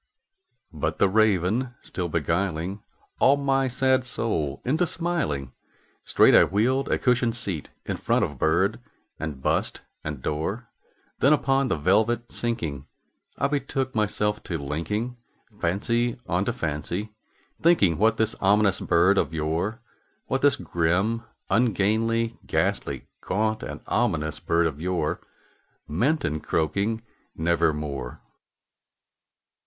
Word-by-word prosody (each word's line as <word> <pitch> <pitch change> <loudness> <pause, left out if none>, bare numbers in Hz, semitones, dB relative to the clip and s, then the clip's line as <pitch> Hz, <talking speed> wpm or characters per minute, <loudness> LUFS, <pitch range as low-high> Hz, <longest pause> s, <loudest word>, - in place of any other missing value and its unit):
'" - - -53 0.3
But 80 0 -2
the 100 - +4
Raven 110 +4 +2
still 90 -2 -4
beguiling 85 +4 -1 0.4
all 140 +1 +5
my 135 -1 +1
sad 130 +1 +2
soul 80 - -1
into 155 +7 +2
smiling, 155 - -2 0.5
Straight - - +5
I - - +8
wheeled 130 +7 +1
a - - +2
cushioned 125 -2 +2
seat 95 -9 -3 0.2
in - - -3
front - - +1
of 75 -3 -8
bird 95 +8 +2 0.4
and 75 -4 -5
bust - - 0 0.2
and 75 -4 -5
door; 95 +11 -3 0.5
Then, 140 +3 +5
upon 135 -2 +2
the 120 - 0
velvet 110 +8 +2
sinking, 80 - -2 0.5
I 140 - +2
betook 135 -2 -2
myself 105 -1 0
to 85 - -2
linking 95 - -3 0.4
Fancy 115 +7 0
unto 95 +6 0
fancy, 85 - -3 0.5
thinking 100 - +4
what 110 +1 +3
this 110 0 +1
ominous 100 0 +3
bird 95 +4 +3
of 80 - -1
yore 85 +9 -1 0.4
What - - -1
this - - +5
grim, 95 +8 0 0.3
ungainly, 115 +1 +1
ghastly, - - -1 0.2
gaunt, 110 +3 0
and - - -6
ominous 75 +1 0
bird 85 0 +1
of 80 -2 -3
yore 90 +1 -1 0.7
Meant 130 - +1
in 75 +1 -1
croaking 100 +11 -1 0.3
"Nevermore." 75 -5 -1
100 Hz, 125 wpm, -25 LUFS, 80-120 Hz, 0.7 s, I